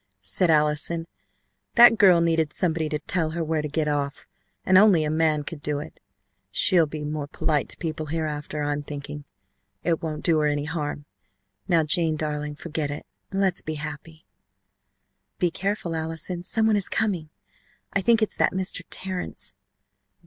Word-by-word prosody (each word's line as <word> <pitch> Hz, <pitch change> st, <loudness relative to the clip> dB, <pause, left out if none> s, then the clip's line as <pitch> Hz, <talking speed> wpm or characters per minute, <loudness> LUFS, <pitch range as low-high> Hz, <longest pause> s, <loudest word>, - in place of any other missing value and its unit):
said 95 Hz, -, +2 dB
Allison. 150 Hz, +2 st, +2 dB, 0.7 s
"That 235 Hz, -2 st, +8 dB
girl 185 Hz, -4 st, +7 dB
needed 165 Hz, -2 st, +1 dB
somebody 165 Hz, -3 st, 0 dB
to 150 Hz, -, -1 dB
tell 165 Hz, 0 st, -1 dB
her 170 Hz, -, 0 dB
where 160 Hz, -1 st, 0 dB
to 150 Hz, -, -3 dB
get 150 Hz, +1 st, -1 dB
off, 145 Hz, 0 st, -2 dB, 0.4 s
and 190 Hz, -, +4 dB
only 190 Hz, -5 st, +6 dB
a 150 Hz, -, -1 dB
man 155 Hz, -1 st, +2 dB
could 145 Hz, 0 st, -7 dB
do 145 Hz, 0 st, -1 dB
it. 150 Hz, +2 st, -8 dB, 0.5 s
She'll 180 Hz, -6 st, +3 dB
be 150 Hz, 0 st, -6 dB
more 150 Hz, -1 st, -3 dB
polite 150 Hz, 0 st, -1 dB
to -, -, -3 dB
people 155 Hz, -2 st, -4 dB
hereafter, 150 Hz, -1 st, -3 dB
I'm 145 Hz, 0 st, -1 dB
thinking. 145 Hz, 0 st, -7 dB, 0.6 s
It 165 Hz, -2 st, 0 dB
won't 155 Hz, -2 st, -4 dB
do 165 Hz, -3 st, +4 dB
her 150 Hz, -, +2 dB
any 145 Hz, 0 st, -1 dB
harm. 150 Hz, -2 st, -4 dB, 0.6 s
Now, 170 Hz, -3 st, +3 dB
Jane 160 Hz, 0 st, +3 dB
darling, 150 Hz, -1 st, -3 dB
forget 155 Hz, -2 st, -3 dB
it, 145 Hz, -, -6 dB, 0.2 s
and 195 Hz, -, -3 dB
let's 190 Hz, -2 st, +2 dB
be 155 Hz, -, -4 dB
happy!" 155 Hz, +2 st, -7 dB, 1.1 s
"Be 175 Hz, -2 st, +1 dB
careful, 195 Hz, -2 st, -2 dB
Allison, 160 Hz, +2 st, -3 dB
some 220 Hz, +5 st, +1 dB
one 220 Hz, -1 st, +4 dB
is 200 Hz, -, 0 dB
coming. 185 Hz, -8 st, -1 dB, 0.6 s
I 200 Hz, -, +2 dB
think 230 Hz, +2 st, +4 dB
it's 215 Hz, -, -2 dB
that -, -, +2 dB
Mr. 185 Hz, 0 st, -2 dB
Terrence." 185 Hz, -1 st, -4 dB
160 Hz, 170 wpm, -25 LUFS, 150-175 Hz, 1.1 s, That